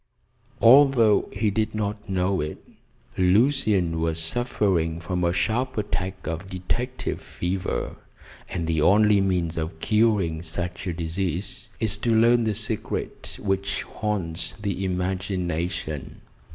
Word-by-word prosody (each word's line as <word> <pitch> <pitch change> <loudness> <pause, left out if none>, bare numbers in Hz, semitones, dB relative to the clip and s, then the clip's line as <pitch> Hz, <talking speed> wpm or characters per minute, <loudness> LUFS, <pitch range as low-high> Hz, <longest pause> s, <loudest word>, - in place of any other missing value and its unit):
Although 120 -4 +6
he 105 +1 0
did 110 +1 -1
not 105 -1 -3
know 95 -1 +1
it, 75 +1 -4 0.6
Lucian 95 - +3
was 80 0 0
suffering 85 -3 0
from 90 +1 -2
a 85 - +3
sharp 120 +8 0
attack 95 -3 -3
of 80 +4 -4
detective 120 +8 -3
fever, 90 +2 -3 0.5
and 85 -3 -2
the 80 -1 0
only 105 +3 +5
means 90 -4 0
of 80 0 -4
curing 105 -6 +2
such 90 +3 -4
a 90 - -1
disease 90 +2 -3
is 110 -2 0
to 115 +1 +1
learn 115 +1 +5
the 110 -2 0
secret 110 +1 -4
which 100 0 -1
haunts 95 -6 -3
the 100 -2 -2
imagination. 90 -4 -2
95 Hz, 125 wpm, -25 LUFS, 85-105 Hz, 0.6 s, Although